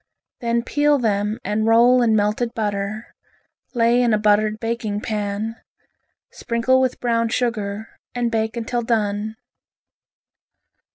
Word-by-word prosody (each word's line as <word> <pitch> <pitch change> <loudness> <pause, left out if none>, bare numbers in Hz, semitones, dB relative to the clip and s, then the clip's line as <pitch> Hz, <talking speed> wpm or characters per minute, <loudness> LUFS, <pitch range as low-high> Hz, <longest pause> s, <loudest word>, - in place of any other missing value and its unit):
Then 235 -1 0
peel 290 +3 +2
them 210 -3 -1
and 210 +2 -1
roll 240 +2 +5
in 225 -2 +3
melted 215 +3 0
butter, 210 0 -3 0.6
lay 235 +1 +3
in 235 -3 +3
a - - +1
buttered 215 +1 +2
baking 225 -2 -3
pan. 210 +1 -3 0.7
Sprinkle 240 +3 +1
with 255 -1 -1
brown 230 -1 0
sugar 220 -3 -3 0.2
and 240 -1 -1
bake 220 +1 -1
until 235 +1 -2
done. 215 -2 -1
225 Hz, 120 wpm, -21 LUFS, 210-235 Hz, 0.7 s, roll